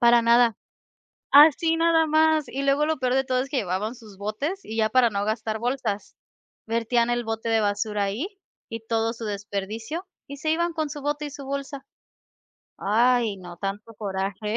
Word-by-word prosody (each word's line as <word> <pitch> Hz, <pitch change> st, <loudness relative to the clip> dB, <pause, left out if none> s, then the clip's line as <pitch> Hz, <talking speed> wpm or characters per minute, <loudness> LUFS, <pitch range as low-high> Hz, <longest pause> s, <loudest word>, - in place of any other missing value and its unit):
Para 240 Hz, -1 st, +6 dB
nada. 235 Hz, -1 st, +4 dB, 0.8 s
Así, 315 Hz, +3 st, +7 dB
nada 330 Hz, -1 st, +3 dB
más. 315 Hz, 0 st, +3 dB
Y 275 Hz, -, -4 dB
luego 280 Hz, +2 st, +2 dB
lo 315 Hz, 0 st, 0 dB
peor 255 Hz, -1 st, 0 dB
de 265 Hz, 0 st, +2 dB
todo 255 Hz, -1 st, 0 dB
es 265 Hz, -, -3 dB
que 280 Hz, -, 0 dB
llevaban 205 Hz, +2 st, -2 dB
sus 220 Hz, -5 st, -14 dB
botes 245 Hz, -, -3 dB
y 220 Hz, -, -6 dB
ya 220 Hz, -1 st, +2 dB
para 245 Hz, -1 st, +4 dB
no 200 Hz, -1 st, -1 dB
gastar 220 Hz, 0 st, -2 dB
bolsas, 235 Hz, -3 st, -3 dB, 0.5 s
vertían 235 Hz, +1 st, +1 dB
el 240 Hz, 0 st, 0 dB
bote 225 Hz, 0 st, -3 dB
de 225 Hz, 0 st, +3 dB
basura 205 Hz, 0 st, 0 dB
ahí 205 Hz, -, -2 dB, 0.4 s
y 230 Hz, -, -5 dB
todo 225 Hz, -1 st, +1 dB
su 230 Hz, -1 st, -8 dB
desperdicio, 210 Hz, -, -4 dB, 0.2 s
y 280 Hz, -, -7 dB
se 310 Hz, -, -1 dB
iban 340 Hz, +2 st, +1 dB
con 315 Hz, -2 st, -2 dB
su 295 Hz, 0 st, -6 dB
bote 295 Hz, +1 st, -2 dB
y -, -, -7 dB
su 285 Hz, 0 st, -9 dB
bolsa. 275 Hz, 0 st, -5 dB, 0.9 s
Ay, 230 Hz, +1 st, +2 dB
no, 175 Hz, -2 st, -10 dB
tanto 205 Hz, +4 st, -5 dB
coraje. 200 Hz, +1 st, -3 dB
235 Hz, 185 wpm, -25 LUFS, 215-280 Hz, 0.9 s, Así